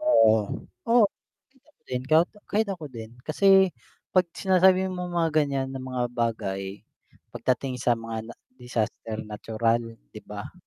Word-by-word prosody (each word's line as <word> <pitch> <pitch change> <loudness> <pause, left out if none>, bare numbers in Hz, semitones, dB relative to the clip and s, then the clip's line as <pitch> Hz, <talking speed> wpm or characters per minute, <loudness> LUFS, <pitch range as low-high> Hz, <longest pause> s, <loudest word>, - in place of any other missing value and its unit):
Oo, 115 - +5 0.5
oo, 235 -1 +6 0.5
kahit 270 +1 -31
ako 305 - -30
din 125 -1 -2
ka 155 +1 +6 0.3
kahit 215 +1 +1
ako 175 -5 -5
din, 115 -4 -9 0.2
kasi 155 +6 0 0.7
'pag 185 -1 +5
sinasabi 190 0 +4
mong 180 -1 -4
mga 165 -1 +2
ganiyan 140 -3 +1
na 135 - -5
mga 130 -1 -3
bagay, 105 -5 -2 0.5
pagdating 130 +1 -1
sa 120 +1 +3
mga 115 0 -6
na - - -9 0.2
disaster 115 -2 -3
natural, 110 +2 0 0.3
'di - - -9
ba? - - -8
130 Hz, 145 wpm, -26 LUFS, 115-180 Hz, 0.7 s, oo